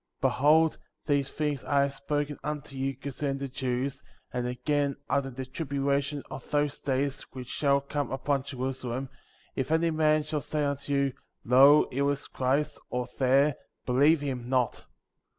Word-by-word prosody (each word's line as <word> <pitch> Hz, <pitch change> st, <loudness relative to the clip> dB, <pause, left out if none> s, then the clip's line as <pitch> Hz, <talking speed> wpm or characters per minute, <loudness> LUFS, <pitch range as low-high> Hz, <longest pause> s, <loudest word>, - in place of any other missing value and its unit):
21. -, -, +3 dB
Behold, 155 Hz, +3 st, +4 dB, 0.3 s
these 140 Hz, -2 st, +1 dB
things 150 Hz, -3 st, -2 dB
I 140 Hz, -1 st, +2 dB
have 140 Hz, 0 st, +1 dB
spoken 145 Hz, +1 st, -2 dB
unto 150 Hz, -2 st, -4 dB
you 135 Hz, 0 st, -1 dB
concerning 135 Hz, +1 st, -3 dB
the 140 Hz, 0 st, -4 dB
Jews; 130 Hz, +1 st, -2 dB, 0.3 s
and 125 Hz, -1 st, -1 dB
again, 140 Hz, +2 st, 0 dB, 0.2 s
after 140 Hz, -1 st, +1 dB
the 130 Hz, 0 st, -6 dB
tribulation 140 Hz, 0 st, -1 dB
of 130 Hz, -, -8 dB
those 145 Hz, -1 st, 0 dB
days 140 Hz, +1 st, -1 dB
which 125 Hz, -2 st, -7 dB
shall 140 Hz, 0 st, +2 dB
come 145 Hz, 0 st, -3 dB
upon 135 Hz, +1 st, 0 dB
Jerusalem, 130 Hz, -1 st, -4 dB, 0.5 s
if 135 Hz, +3 st, -2 dB
any 165 Hz, +1 st, +3 dB
man 155 Hz, -1 st, +3 dB
shall 150 Hz, -1 st, -2 dB
say 150 Hz, +1 st, -2 dB
unto 140 Hz, 0 st, -2 dB
you, 140 Hz, -1 st, +2 dB, 0.3 s
Lo, 135 Hz, +5 st, +7 dB
here 140 Hz, +2 st, +1 dB
is 145 Hz, -1 st, -2 dB
Christ, 140 Hz, +3 st, 0 dB
or 125 Hz, 0 st, -2 dB
there, 135 Hz, +2 st, +4 dB, 0.3 s
believe 145 Hz, +5 st, +4 dB
him 130 Hz, -4 st, -4 dB
not; 125 Hz, -3 st, +2 dB
22. -, -, -16 dB
140 Hz, 165 wpm, -28 LUFS, 130-145 Hz, 0.5 s, Lo